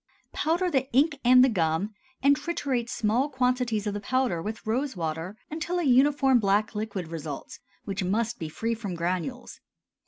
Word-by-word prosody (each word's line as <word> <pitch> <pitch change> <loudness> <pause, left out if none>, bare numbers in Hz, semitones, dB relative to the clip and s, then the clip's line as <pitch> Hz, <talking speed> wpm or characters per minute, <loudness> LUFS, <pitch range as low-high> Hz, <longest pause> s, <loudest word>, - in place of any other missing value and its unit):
Powder 345 +3 0
the 265 -2 0
ink 290 +3 +3
and 250 +1 +7
the - - +4
gum, 180 -1 0 0.3
and 280 +1 +6
triturate 280 -6 -2
small 235 +7 +1
quantities 250 -5 0
of 205 - -1
the 205 - -3
powder 250 -5 0
with 215 +6 -6
rose 255 +5 -1
water 165 +4 -4
until 330 +3 -2
a 350 - 0
uniform 270 -1 +4
black 205 +1 +1
liquid 210 -5 -4
results, 155 -3 -6 0.3
which 195 -1 -3
must 225 +5 -1
be 160 - -4
free 225 +8 -2
from 210 -5 -5
granules. 185 +9 -3
230 Hz, 165 wpm, -27 LUFS, 195-265 Hz, 0.3 s, and